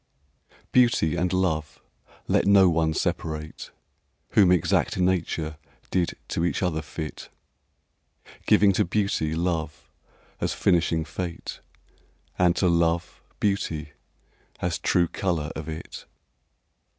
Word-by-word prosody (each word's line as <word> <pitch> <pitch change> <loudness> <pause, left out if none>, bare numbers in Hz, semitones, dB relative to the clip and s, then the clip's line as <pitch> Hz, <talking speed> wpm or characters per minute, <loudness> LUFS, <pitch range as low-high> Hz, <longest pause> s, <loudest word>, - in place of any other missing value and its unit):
XIX. 70 +1 -35
Beauty 115 -10 +3
and 90 0 0
love 80 -5 -1 0.5
let - - +2
no 100 -2 +7
one 80 -1 +1
separate, 80 0 -3 0.6
Whom 95 -4 +5
exact 90 0 +2
Nature 85 -4 0 0.3
did 90 -2 0
to 85 - -1
each 85 - 0
other 80 -3 0
fit, 80 0 -7 1.2
Giving 100 -1 +6
to 95 - +2
Beauty 85 -5 0
love 80 -3 -3 0.5
as - - -1
finishing 85 -3 +2
fate 85 0 -6 0.8
And 90 -1 +4
to 90 - +2
Love 85 0 +1 0.2
beauty 85 -7 -1 0.7
as 85 -2 -1
true 85 -1 +2
colour 80 -4 -2
of 80 0 -6
it. 80 0 -8
85 Hz, 115 wpm, -25 LUFS, 80-90 Hz, 1.2 s, no